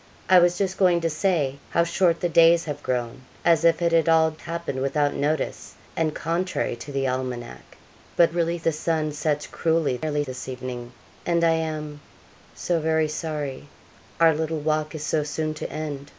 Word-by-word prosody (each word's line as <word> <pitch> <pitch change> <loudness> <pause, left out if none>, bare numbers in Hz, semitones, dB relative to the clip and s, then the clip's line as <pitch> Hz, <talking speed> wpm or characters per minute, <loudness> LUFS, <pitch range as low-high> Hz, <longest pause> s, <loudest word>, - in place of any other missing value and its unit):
'I 185 - +9
was 175 0 +3
just 190 -1 -2
going 180 -3 +4
to 165 0 0
say 155 -5 0
how 170 - +2
short 170 0 +1
the 175 - +2
days 165 0 +5
have 145 -2 -5
grown, 125 -1 -3 0.2
as 165 -2 +4
if 170 0 +3
it 170 - +2
had 165 0 +3
all 160 -1 +4
happened 165 -3 -5
without 145 +1 +1
notice, 150 +2 -2 0.2
and 155 -2 0
contrary 170 -3 -1
to 145 - -9
the 135 -1 -1
almanac; 125 - -5 0.4
but 170 -1 +4
really 170 0 0
the 165 0 0
sun 155 0 -1
sets 150 0 -1
cruelly 160 -6 0
early 150 -1 0
this 130 -2 -7
evening, 125 -1 -6 0.3
and 170 -1 +1
I 165 - +5
am 155 -2 -3 0.5
so 175 -2 0
very 160 0 +1
sorry 150 -3 -4 0.5
our 165 -1 +6
little 160 +1 -2
walk 155 +1 -1
is 155 -1 -5
so 160 -2 +1
soon 155 +1 -3
to 150 - -6
end.' 145 -2 -5
155 Hz, 180 wpm, -24 LUFS, 145-165 Hz, 0.5 s, I